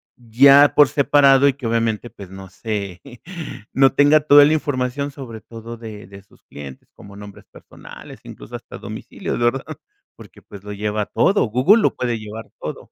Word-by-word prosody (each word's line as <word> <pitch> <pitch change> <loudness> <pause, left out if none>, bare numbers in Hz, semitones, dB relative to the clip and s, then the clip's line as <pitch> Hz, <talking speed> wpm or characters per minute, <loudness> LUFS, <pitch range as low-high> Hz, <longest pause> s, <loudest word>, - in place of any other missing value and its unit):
ya 135 +5 +5
por 145 -2 +5
separado, 140 -1 +3
y 140 - +2
que 130 -3 -7
obviamente, 115 0 -2
pues, 100 -2 -13
no 95 0 -11
se, 100 -3 -6 0.7
no 135 0 +3
tenga 145 +2 +4
toda 145 -1 +6
la 155 - +2
información, 140 -1 -3
sobre 120 -6 -10
todo 115 0 -11
de 110 -3 -11
de 100 0 -14
sus 100 - -26
clientes, 70 -2 -12
como 100 0 -15
nombres 100 0 -13
personales, - - -14
incluso, - - -11
hasta - - -10
domicilios, - - -7
¿verdad? 120 +3 -2 0.4
Porque, - - -16
pues, 100 -2 -14
lo 105 - -9
lleva 105 +1 -3
todo 200 - +1
Google, 130 - +3
lo - - +1
puede 120 -2 -2
llevar 110 +1 -9
todo. - - -8
115 Hz, 170 wpm, -19 LUFS, 105-140 Hz, 0.7 s, toda